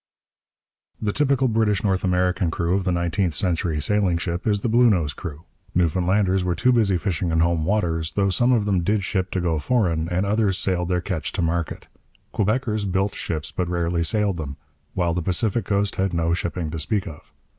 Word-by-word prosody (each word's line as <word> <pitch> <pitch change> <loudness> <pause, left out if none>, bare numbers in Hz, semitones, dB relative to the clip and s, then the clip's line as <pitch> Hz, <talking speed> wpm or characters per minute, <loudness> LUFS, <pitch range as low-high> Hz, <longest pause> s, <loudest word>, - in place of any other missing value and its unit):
The 105 -2 -1
typical 140 -2 +2
British 110 -3 +1
North 95 -3 +1
American 90 -1 +1
crew 85 +1 -1
of 95 -1 0
the 90 - +1
nineteenth 85 0 0
century 85 -2 0
sailing 90 +3 +1
ship 85 +4 -3
is 100 -2 +1
the - - -1
Bluenose 110 -10 +3
crew. 80 -3 -7 0.3
Newfoundlanders 90 +3 +2
were 90 -1 0
too 125 +6 +3
busy 105 -6 +3
fishing 90 -2 -2
in 80 0 +1
home 85 -2 +1
waters, 85 -5 0
though 100 -1 +1
some 120 +7 +3
of 115 -5 +2
them 95 -4 +1
did 100 +3 0
ship 95 -1 -1
to 95 - -2
go 85 -3 0
foreign 85 -6 0
and 90 +2 0
others 100 -2 +1
sailed 90 -2 0
their 90 -1 +1
catch 85 -6 -3
to 90 - -1
market. 85 0 -2 0.5
Quebeckers 110 0 0
built 95 +2 0
ships, 75 -2 -4
but 90 -2 -2
rarely 85 -1 0
sailed 100 +1 +1
them; 70 -3 -6 0.4
while 85 -2 +1
the 90 - -1
Pacific 100 +6 0
coast 100 -1 0
had 95 -2 0
no 85 0 +1
shipping 85 -2 -3
to 80 - -4
speak 100 +5 -1
of. 75 - -11
90 Hz, 195 wpm, -23 LUFS, 85-105 Hz, 0.5 s, Bluenose